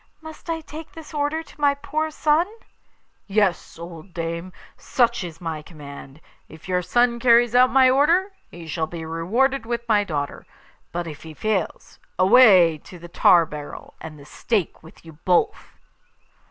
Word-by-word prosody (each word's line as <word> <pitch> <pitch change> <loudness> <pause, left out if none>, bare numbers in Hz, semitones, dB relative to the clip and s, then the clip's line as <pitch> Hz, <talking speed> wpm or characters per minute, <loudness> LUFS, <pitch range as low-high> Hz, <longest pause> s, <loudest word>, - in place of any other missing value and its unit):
Must 315 +1 -12
I 325 -1 -2
take 315 +1 -10
this 320 -1 -12
order 295 +2 -1
to 300 - -18
my 285 -1 +3
poor 300 +2 -3
son?' 310 +4 +1 0.8
'Yes, 200 -3 0
old 170 +1 -11
dame; 170 +2 -4 0.2
such 235 -3 0
is 165 -2 -8
my 160 -3 -5
command. 145 -2 -12 0.3
If 160 +2 -14
your 180 -1 0
son 240 +6 +1
carries 235 -1 +4
out 250 +1 +5
my 265 -1 +5
order, 330 +9 +3 0.2
he 170 -1 -11
shall 160 0 -3
be 165 0 -7
rewarded 225 +11 0
with 235 0 -3
my 210 -2 +3
daughter; 145 -7 -5 0.4
but 175 0 -3
if 155 -3 -9
he 160 -1 -11
fails, 210 -3 -3 0.2
away 185 -5 +6
to 180 - -13
the 175 0 -12
tar 170 0 +5
barrel 150 -1 -9
and 155 -1 -9
the 140 - -14
stake 205 +2 -2
with 160 +1 -17
you 160 -2 -14
both! 180 -2 0
195 Hz, 165 wpm, -22 LUFS, 165-265 Hz, 0.8 s, away